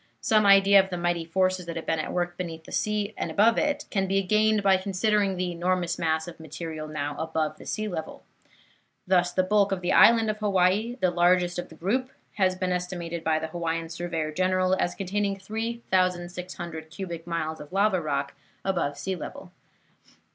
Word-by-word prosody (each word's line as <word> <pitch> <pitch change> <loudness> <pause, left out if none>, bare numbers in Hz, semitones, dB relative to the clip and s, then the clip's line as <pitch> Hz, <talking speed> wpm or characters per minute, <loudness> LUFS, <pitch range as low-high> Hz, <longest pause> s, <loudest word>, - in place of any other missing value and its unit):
Some 215 -2 +3
idea 195 0 +7
of 190 - -9
the 180 - -3
mighty 175 -1 0
forces 185 +1 0
that 170 - -5
have 165 - -5
been 160 - 0
at 155 - -3
work 175 0 -1
beneath 165 -3 -6
the - - -13
sea 210 0 -1
and - - -2
above 225 +3 +4
it 295 0 0
can 195 -1 0
be 195 +1 +1
gained 215 +2 +2
by 195 -1 +5
considering 200 0 0
the 180 0 -1
enormous 175 0 -1
mass 160 0 0
of 170 - -10
material 160 0 -6
now 145 -1 -4
above 160 -1 -2
the - - -11
sea 215 0 -2
level. 170 -5 -6 0.8
Thus, 180 -1 +3
the 185 - +2
bulk 205 +1 +2
of 190 -2 -1
the 175 - 0
island 230 -1 +6
of 215 - -9
Hawaii, 205 +3 +2
the 185 - +3
largest 175 0 +2
of - - -6
the 160 - -13
group, 240 +11 -1 0.3
has 185 -2 +2
been 185 0 -2
estimated 175 -2 -3
by 160 -1 +2
the 160 0 -4
Hawaiian 165 0 -3
Surveyor 165 -2 -3
General 185 +2 +1
as 175 - -1
containing 200 +1 -1
3,600 185 -6 -3
cubic 170 -2 -7
miles 160 -2 -3
of 150 - -11
lava 195 -1 +2
rock 140 -2 -2 0.3
above 175 -7 -1
sea 190 0 -3
level. 180 +2 -8
180 Hz, 190 wpm, -26 LUFS, 165-195 Hz, 0.8 s, idea